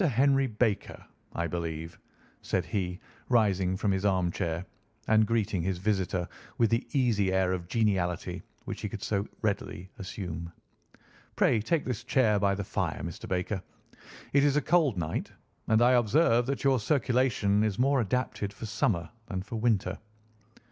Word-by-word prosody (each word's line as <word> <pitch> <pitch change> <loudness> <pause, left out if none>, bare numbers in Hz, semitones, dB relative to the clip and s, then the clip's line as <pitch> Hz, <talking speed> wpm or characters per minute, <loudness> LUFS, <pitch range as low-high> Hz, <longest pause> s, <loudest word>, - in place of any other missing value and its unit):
Henry 135 +1 +3
Baker, 110 -2 -1 0.3
I 85 - -1
believe," 80 0 -4 0.4
said 90 -3 -1
he, 90 +1 -2 0.3
rising 95 -6 +2
from 105 0 +1
his 95 0 0
armchair 90 -3 0 0.4
and 110 -1 +4
greeting 105 -5 0
his 90 +1 -1
visitor 95 -2 0 0.3
with 115 -2 +3
the 115 - +1
easy 115 -8 +2
air 95 -1 +2
of 90 -2 -4
geniality 95 -6 0 0.2
which - - -5
he - - -3
could - - -7
so 100 -1 -1 0.2
readily 95 -3 -2
assume. 90 -4 -5 0.8
"Pray 110 - +3
take 155 +8 0
this 125 -5 -3
chair 110 -6 +3
by 100 0 +2
the 100 - -3
fire, 95 - -2
Mr. 85 0 -6
Baker. 95 +2 -1 0.7
It 140 0 +5
is 145 -1 +3
a 150 - +3
cold 155 - +3
night, 80 -2 -3 0.4
and 110 +1 +4
I 125 - +6
observe 120 0 +3
that 140 - -2
your 135 -2 +4
circulation 120 -4 +2
is 105 -3 0
more 135 +1 +3
adapted 105 -2 -1
for 100 +3 -8
summer 100 -5 0 0.2
than 95 -4 -3
for 115 +3 -5
winter. 105 -4 +1
105 Hz, 155 wpm, -29 LUFS, 95-120 Hz, 0.8 s, I